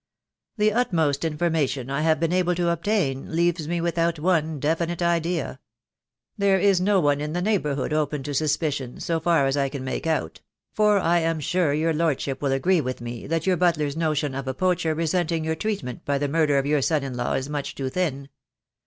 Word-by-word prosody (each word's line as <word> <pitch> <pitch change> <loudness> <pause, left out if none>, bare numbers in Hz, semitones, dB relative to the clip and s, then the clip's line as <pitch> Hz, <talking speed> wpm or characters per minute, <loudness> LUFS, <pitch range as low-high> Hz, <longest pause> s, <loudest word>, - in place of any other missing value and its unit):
"The 210 0 +3
utmost 165 - +1
information 150 -5 -1
I 140 +2 -1
have 160 0 +2
been 165 +1 0
able 180 -1 +2
to 170 -1 +1
obtain 170 -6 -1
leaves 170 -2 +1
me 170 +1 -1
without 170 0 0
one 160 -2 0
definite 165 +4 -1
idea. 170 0 -1 0.8
There 200 -2 +3
is 190 -1 +3
no 200 +1 +3
one 145 -3 +2
in 150 +1 -3
the 175 - -1
neighbourhood 150 -9 0
open 150 -2 -1
to 145 - -4
suspicion, 145 -3 -1
so 165 -1 -1
far 165 -3 +2
as 135 0 +1
I 140 -1 +1
can 135 -1 -6
make 130 +5 -3
out; 155 - -2 0.3
for 210 -1 +3
I 175 -2 +2
am 165 -1 0
sure 170 +1 +1
your 160 +3 +1
lordship 150 -4 -1
will 140 -2 0
agree 170 +6 +2
with 130 -1 -4
me 120 0 -7
that 165 +1 -1
your 185 -2 +2
butler's 155 -5 +1
notion 155 -3 0
of 135 0 -5
a 130 - -2
poacher 170 -2 +1
resenting 165 0 0
your 160 - 0
treatment 195 - -4
by 140 0 0
the 145 +1 -1
murder 150 -1 +2
of 135 - +1
your 145 0 +2
son 150 +1 +1
in 135 -2 -5
law 120 0 -1
is 130 - -2
much 145 -1 -4
too 135 -1 -3
thin. 140 -6 -2
160 Hz, 205 wpm, -24 LUFS, 140-175 Hz, 0.8 s, The